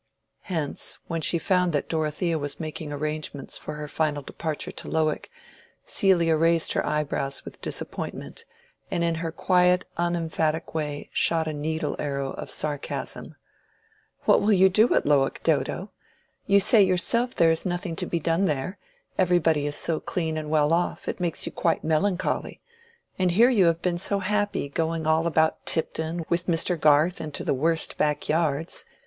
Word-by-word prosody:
Hence, 160 -7 -1
when 165 -1 -3
she 170 - +3
found 180 0 +1
that 145 - -1
Dorothea 160 +1 -1
was 145 -1 -4
making 155 -1 -5
arrangements 150 -1 -4
for 150 - -6
her 150 0 -6
final 150 -1 -1
departure 155 +2 -4
to - - -8
Lowick, 155 -1 -1 0.6
Celia 170 -4 +3
raised 165 +1 +2
her - - 0
eyebrows 145 -2 -1
with - - -11
disappointment, 465 - -5 0.5
and 170 - -1
in 170 0 +1
her 165 -1 -3
quiet 180 +1 +2
unemphatic 165 -2 -1
way 150 -2 -4
shot 165 -1 +2
a 155 - -2
needle 155 +1 -2
arrow 140 -2 -2
of - - -7
sarcasm. 145 -2 -3 0.9
"What - - +5
will 210 +1 +3
you 190 0 +6
do 215 +5 +4
at - - +2
Lowick, 140 -2 +2
Dodo? - - 0 0.6
You 200 0 +5
say 210 +2 +5
yourself 215 +7 +1
there 165 -1 +4
is 165 - 0
nothing 175 -1 -3
to - - -2
be 170 - -1
done 165 +4 +1
there: 155 +5 -2 0.4
everybody 165 -5 +3
is 145 - -3
so 165 -2 0
clean 160 -3 -2
and 155 -1 -4
well 155 0 +3
off, 175 +1 -1
it - - -3
makes 175 -2 -1
you - - -4
quite 165 - 0
melancholy. 180 +4 -1 0.6
And 185 -1 +3
here 230 +9 +5
you 205 -7 +4
have 165 0 +1
been 175 -1 0
so 200 +2 0
happy 205 -4 -1
going 160 +2 -2
all 160 +1 +2
about 160 -1 +1
Tipton 160 +1 +1
with 170 +1 0
Mr. 175 +1 +2
Garth 155 +4 +4
into 155 -2 -4
the - - +1
worst 160 +4 +1
backyards. 155 +1 0
165 Hz, 165 wpm, -25 LUFS, 150-180 Hz, 0.9 s, you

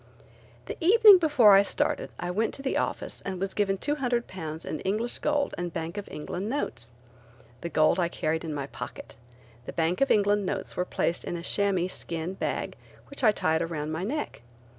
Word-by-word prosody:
The - - -6
evening 415 +1 +8
before 285 - +6
I 195 - +8
started 200 - -1
I 175 - -3
went 220 +5 -1
to 275 - -8
the 270 - -1
office - - -2
and 190 -2 -5
was 195 0 -2
given 195 -2 +1
£200 235 - -2
in 155 - -4
English 215 +7 -2
gold 290 -1 0
and 175 -1 -3
Bank 165 +2 -5
of 205 -1 -6
England 180 +7 -5
notes. 175 - -3 0.7
The 170 - -4
gold 155 +3 +3
I 175 - +2
carried 160 -1 -2
in 160 - -4
my 145 -2 -3
pocket. - - -9 0.5
The - - -5
Bank 170 +5 0
of 275 - +3
England 205 0 +3
notes 190 0 -4
were 180 - -1
placed 170 -1 -1
in 175 - -4
a 170 - -7
chamois 195 -2 +1
skin 170 -1 -5
bag - - -3 0.4
which 280 - -5
I 215 - +7
tied 160 -5 0
around 155 -2 -3
my 160 +3 -3
neck. 285 - -4
190 Hz, 190 wpm, -27 LUFS, 165-230 Hz, 0.7 s, evening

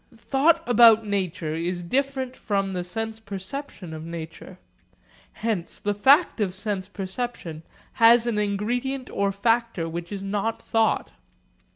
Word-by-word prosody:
Thought 305 +7 +2
about 230 -2 +7
nature 185 -6 -2
is 175 +2 -3
different 265 +4 -1
from 195 -4 -1
the 180 -1 -2
sense 225 +4 -4
perception 200 - -7
of 155 0 -7
nature. 165 +2 -8 0.8
Hence 215 -6 -3
the 205 - -1
fact 265 - +4
of 190 -3 0
sense 195 -2 -2
perception 190 -4 -5 0.4
has 230 +1 +7
an 230 -3 0
ingredient 240 +6 -2
or 200 0 0
factor 225 -3 0
which 170 +2 -6
is 195 -1 -5
not 205 +3 -2
thought. 225 -1 0
205 Hz, 135 wpm, -25 LUFS, 185-235 Hz, 0.8 s, about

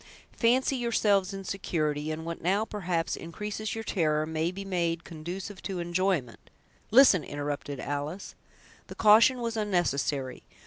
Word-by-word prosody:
Fancy 260 +3 +2
yourselves 210 -5 +2
in 195 0 -6
security, 155 -6 -2
and 160 +1 -4
what 170 0 -5
now, 195 +5 +1
perhaps, 180 -6 -2
increases 210 +6 -5
your 225 - -4
terror, 155 -7 +1
may 160 +1 -1
be 195 +2 -7
made 170 -3 -1
conducive 175 +5 -7
to 190 -2 -4
enjoyment—" 175 -7 -1 0.4
"Listen!" 230 - +6
interrupted 145 -1 -4
Alice. 145 +7 -4 0.5
The - - -9
caution 225 +4 +6
was 230 -1 -2
unnecessary. 145 - -1
180 Hz, 135 wpm, -28 LUFS, 155-210 Hz, 0.5 s, Listen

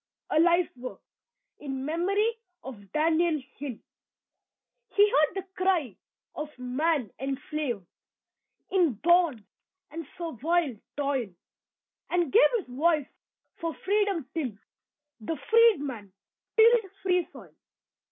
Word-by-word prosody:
A 310 - +4
LIFE 345 -1 +3
WORK 255 +1 -7 0.6
IN 270 -2 -5
MEMORY 395 +8 +1 0.3
OF 205 -7 -10
DANIEL 320 +1 +2 0.2
HILL 270 -5 -5 1.2
He 410 0 +6
heard 300 +4 +3
the 385 - -3
cry 360 - +1 0.4
of 300 0 -5
man 255 - 0
enslaved 270 - -3 0.9
In 355 -8 +3
bonds 330 - +3 0.5
and 325 -1 -6
servile 330 -2 0 0.2
toil; 275 -6 -1 0.8
And 350 -5 0
gave 455 - +7
his 415 - -6
voice 300 +4 +1 0.5
for 330 -3 -3
freedom 400 -5 0
till 260 -11 -3 0.6
The 300 +9 -4
"Freedman" 290 - +3 0.5
tilled 445 -3 +5
"free 360 -3 +2
soil." - - -13
315 Hz, 105 wpm, -28 LUFS, 265-360 Hz, 1.2 s, gave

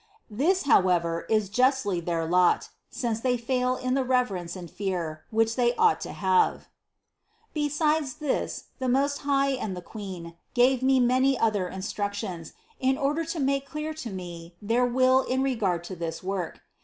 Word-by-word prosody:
This, 330 - +2
however, 175 -9 +2
is 215 -2 +2
justly 250 -3 +2
their 170 -1 -2
lot, 180 +2 +3 0.2
since 230 -3 -2
they 250 +1 +1
fail 250 +1 0
in 255 0 -2
the 270 0 +2
reverence 225 -10 0
and 180 -2 -7
fear, 170 -5 -4
which 225 +1 +1
they 245 -1 +2
ought 445 -2 +3
to - - -5
have." 445 -2 +1 0.8
Besides 300 -1 0
this 300 -3 -3
the 260 -1 -1
Most 280 +3 +1
High 275 -1 +2
and 220 -8 -3
the - - -5
Queen 180 -5 -8 0.2
gave 250 +1 +4
me 265 0 +4
many 255 +2 +3
other 210 -5 +1
instructions, 200 -2 -4 0.3
in 265 0 +2
order 295 +3 0
to 330 0 -4
make 275 0 0
clear 305 +1 -4
to 305 -7 -6
me 175 -3 -8
their 235 +4 +1
will 255 +1 +4
in 260 0 -1
regard 200 -10 0
to 185 +2 -7
this 165 -1 -5
work. 185 -3 -3
240 Hz, 165 wpm, -27 LUFS, 185-270 Hz, 0.8 s, gave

